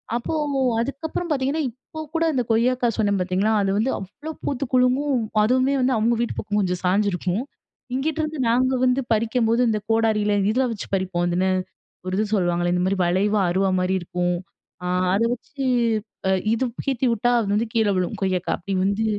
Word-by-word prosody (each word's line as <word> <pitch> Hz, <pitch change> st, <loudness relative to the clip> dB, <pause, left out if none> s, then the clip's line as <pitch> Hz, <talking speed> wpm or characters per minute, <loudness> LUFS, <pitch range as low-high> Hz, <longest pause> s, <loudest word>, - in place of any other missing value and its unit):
அப்போ 240 Hz, +6 st, -2 dB, 0.5 s
அதுக்கப்றம் 305 Hz, +7 st, -3 dB
பாத்தீங்கன்னா 280 Hz, +2 st, 0 dB
இப்போ 255 Hz, +6 st, -12 dB, 0.2 s
கூட 330 Hz, 0 st, +2 dB
இந்த 250 Hz, -3 st, +1 dB
கொய்யாக்கா 245 Hz, +2 st, +2 dB
சொன்னேன் 205 Hz, -3 st, +1 dB
பாத்தீங்களா, 190 Hz, +4 st, +1 dB
அது 195 Hz, -1 st, +1 dB
வந்து 230 Hz, +5 st, +1 dB
அவ்ளோ 290 Hz, +12 st, -8 dB
பூத்து 275 Hz, 0 st, -2 dB
குலுங்கும், 255 Hz, +2 st, +3 dB, 0.2 s
அதுமே 255 Hz, +4 st, +2 dB
வந்து 255 Hz, 0 st, +2 dB
அவங்க 230 Hz, +2 st, +2 dB
வீட்டு 235 Hz, -, -2 dB
பக்கம் 210 Hz, 0 st, -1 dB
கொஞ்சம் 180 Hz, -2 st, -1 dB
சாஞ்சிருக்கும். 190 Hz, +2 st, +1 dB, 0.5 s
இங்கிட்ருந்து 310 Hz, +2 st, -2 dB
நாங்க 255 Hz, +3 st, +2 dB
வந்து 255 Hz, +1 st, +2 dB
பறிக்கும்போது 230 Hz, +1 st, +1 dB
இந்த 215 Hz, -1 st, 0 dB
கோடாரில 220 Hz, -2 st, +2 dB, 0.2 s
இத 255 Hz, +4 st, +2 dB
வச்சு 205 Hz, -, -7 dB
பறிப்போம் 185 Hz, -2 st, -1 dB
இதுன்னு 185 Hz, +2 st, +1 dB, 0.6 s
ஒரு 185 Hz, -, -2 dB
இது 215 Hz, -, +1 dB
சொல்வாங்களே? 175 Hz, -2 st, +1 dB
இந்த 180 Hz, 0 st, +1 dB
மாரி 195 Hz, +1 st, 0 dB
வளைவா 200 Hz, +4 st, +2 dB
அறுவா 190 Hz, +2 st, +2 dB
மாரி 185 Hz, +1 st, +1 dB
இருக்கும். 175 Hz, 0 st, -1 dB, 0.5 s
ஆ -, -, -1 dB, 0.3 s
அத 205 Hz, +4 st, +2 dB
வச்சு 270 Hz, +3 st, -6 dB, 0.6 s
அ -, -, +2 dB, 0.2 s
இது 230 Hz, +3 st, +1 dB, 0.2 s
சீச்சி 265 Hz, -2 st, 0 dB
விட்டா 230 Hz, +1 st, +1 dB
அது 220 Hz, -, -1 dB
வந்து 220 Hz, +2 st, +1 dB
கீழ 220 Hz, -2 st, +2 dB
விழும் 180 Hz, -1 st, -1 dB
கொய்யாக்கா 185 Hz, -2 st, 0 dB
அப்டி 195 Hz, +3 st, -5 dB
வந்து 200 Hz, +3 st, 0 dB
220 Hz, 170 wpm, -23 LUFS, 190-255 Hz, 0.6 s, குலுங்கும்